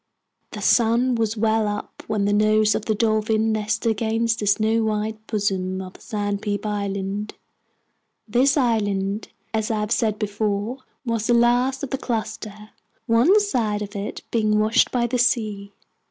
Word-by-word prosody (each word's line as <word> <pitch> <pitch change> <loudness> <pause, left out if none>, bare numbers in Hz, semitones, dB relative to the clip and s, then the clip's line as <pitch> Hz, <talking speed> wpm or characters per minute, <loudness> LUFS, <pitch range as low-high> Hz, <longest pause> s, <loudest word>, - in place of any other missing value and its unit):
The - - -7
sun 240 +2 +3
was 225 -1 -1
well 220 0 +2
up 205 0 -5
when 210 -2 0
the 205 - +2
nose 215 +1 +3
of 215 - -3
the 220 - 0
Dolphin 220 0 +1
nestled 220 +2 0
against 225 +1 0
the 205 - -2
snow 220 +2 +2
white 215 0 -2
bosom 190 -3 -1
of 185 -1 -7
Sandpeep 205 -1 -3
Island. 200 0 -3 0.9
This 260 +6 +3
island, 205 -5 0 0.3
as 220 -1 -1
I 220 -2 0
have 210 +1 -3
said 220 -3 +1
before, 210 +3 -2 0.3
was 230 -2 -1
the 240 - +4
last 245 +3 +2
of 280 - -4
the 270 - -2
cluster, 215 -2 -5 0.3
one 250 - +5
side 225 - 0
of 205 0 -9
it 200 +1 -5
being 215 -2 +2
washed 215 +4 +3
by 240 -2 +1
the 245 +1 -1
sea. 215 -5 0
215 Hz, 155 wpm, -23 LUFS, 205-230 Hz, 0.9 s, one